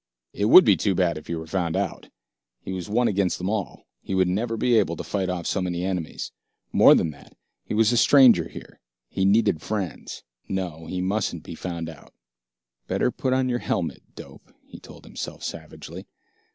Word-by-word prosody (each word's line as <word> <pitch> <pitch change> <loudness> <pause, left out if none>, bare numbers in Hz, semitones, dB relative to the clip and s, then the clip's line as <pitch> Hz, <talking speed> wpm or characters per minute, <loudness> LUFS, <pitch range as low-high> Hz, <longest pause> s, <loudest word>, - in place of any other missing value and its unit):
It 100 - -1
would 185 +11 +9
be - - +6
too 100 -3 0
bad 85 -3 +1
if 75 - -18
he 85 - -3
were 80 0 -6
found 85 -1 -2
out. - - -3 0.5
He 95 - -5
was 90 -1 -5
one 120 +3 +2
against 95 -2 0
them 90 +3 -3
all, 105 -6 -4 0.2
he 95 - -4
would 95 -1 +3
never 110 +5 -1
be 120 0 +3
able 85 -5 0
to - - -6
fight 95 -2 -2
off 90 -2 -3
so 95 - -1
many 90 0 -2
enemies. 90 -4 -4 0.4
More - - +7
than 80 - +1
that, 70 - -18 0.3
he - - -3
was 110 +1 +4
a 120 - +2
stranger 120 - +6
here, - - -12 0.3
he 95 - -1
needed 100 -5 +3
friends. 95 -7 -5 0.3
No, 85 -4 -4
he 90 - -3
mustn't 100 +2 -2
be - - -8
found 85 -2 -5
out. 80 -3 -13 0.7
"Better - - 0
put 130 - -1
on 130 0 +1
your 120 -1 -1
helmet, 85 -7 -2
dope," - - -13
he - - -12
told - - -14
himself - - -7
savagely. - - -8
95 Hz, 195 wpm, -24 LUFS, 85-110 Hz, 0.7 s, would